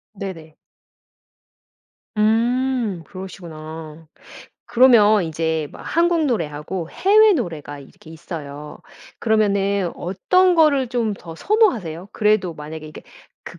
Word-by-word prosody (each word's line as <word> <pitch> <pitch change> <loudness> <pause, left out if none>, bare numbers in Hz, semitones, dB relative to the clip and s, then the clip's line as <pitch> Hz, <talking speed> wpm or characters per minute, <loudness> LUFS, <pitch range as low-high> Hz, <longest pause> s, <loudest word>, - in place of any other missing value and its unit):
네네. 165 -6 -8 1.6
음. 230 -2 +1
그러시구나. 160 -4 -10 0.6
그러면 220 -5 +5
이제 160 -1 -2
막 - - -12
한국 335 -1 +1
노래하고 165 - -3
해외 425 +2 +5
노래가 160 - -4
이렇게 140 +3 -16
있어요. 150 -3 -8 0.4
그러면은 200 -4 +1
어떤 365 - +2
거를 295 -5 +4
좀 230 -3 -1
더 165 -4 -11
선호하세요? 205 - 0
그래도 210 -5 +1
만약에 155 +1 -8
이게 155 - -11 0.4
그 - - -10
195 Hz, 245 characters per minute, -21 LUFS, 160-245 Hz, 1.6 s, 그러면